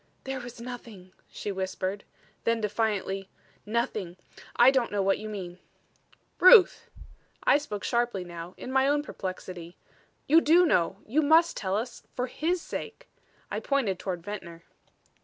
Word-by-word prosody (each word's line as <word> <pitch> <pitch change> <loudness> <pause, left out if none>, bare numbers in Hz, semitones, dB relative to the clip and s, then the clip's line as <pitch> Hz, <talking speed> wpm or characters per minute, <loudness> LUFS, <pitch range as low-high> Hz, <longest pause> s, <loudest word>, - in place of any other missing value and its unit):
"There 265 0 -4
was 245 -1 -9
nothing," 230 -6 -9 0.2
she 205 - -5
whispered 190 +1 -3 0.4
then 230 0 +1
defiantly 205 -3 -1 0.4
"nothing. 210 -5 -2 0.4
I 240 +2 +7
don't 260 -3 +1
know 205 -1 0
what 195 0 +2
you 215 - -6
mean." 185 -4 -7 0.8
"Ruth!" 370 +1 +7 0.5
I 285 - +5
spoke 210 -9 -6
sharply 235 -6 0
now, 170 0 -9
in 255 - -7
my 265 0 +3
own 290 +1 +2
perplexity. 185 - -7 0.5
"You 320 +4 +6
do 340 +4 +5
know. 185 - +2
You 280 +8 +1
must 320 +3 +4
tell 190 -1 -2
us 235 +2 -5
for 250 - -1
his 330 +7 -2
sake." - - -7 0.4
I - - -1
pointed 240 -10 0
toward 180 -3 -4
Ventnor. 170 -4 -8
215 Hz, 145 wpm, -28 LUFS, 190-265 Hz, 0.8 s, I